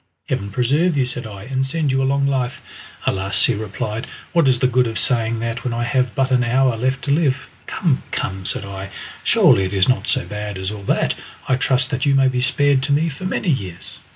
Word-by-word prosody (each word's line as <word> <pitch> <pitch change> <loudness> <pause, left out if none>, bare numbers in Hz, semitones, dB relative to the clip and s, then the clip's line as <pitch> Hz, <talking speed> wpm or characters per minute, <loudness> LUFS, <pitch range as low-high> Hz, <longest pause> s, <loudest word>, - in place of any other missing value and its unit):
"Heaven 100 - -2
preserve 140 - +1
you," 130 - +2
said 125 -2 -3
I, 100 -2 -9
"and 130 +2 -1
send 145 +1 -1
you 135 0 +1
a - - +1
long 140 0 +1
life!" 130 -2 -1 0.5
"Alas!" 95 +1 +3
he 125 - +2
replied, 110 +2 -4 0.3
"what 170 -5 +4
is 130 -1 +4
the 125 - +1
good 125 -1 +3
of 115 - -4
saying 115 -2 +3
that 115 0 -3
when 120 -2 -2
I 120 - -1
have 125 -2 0
but 135 0 +1
an 125 -1 +3
hour 125 0 +2
left 130 +3 -1
to 140 - -1
live!" 140 -3 +1 0.2
"Come, 155 -8 0
come!" 95 0 -3
said 100 - -1
I, 100 0 -7 0.3
"surely 95 - +5
it 95 +1 -3
is 95 -1 +3
not 130 - +1
so 130 -1 +1
bad 105 -1 -5
as 95 +1 -3
all 105 -1 -7
that. - - +1 0.3
I 130 - +3
trust 130 0 +1
that 135 +2 -1
you 140 - +4
may 135 -1 +4
be 125 -1 -1
spared 135 +2 +3
to 140 +2 -1
me 155 +4 +2
for 155 +5 -8
many 185 0 -1
years." 95 - -2
125 Hz, 235 wpm, -20 LUFS, 110-135 Hz, 0.5 s, surely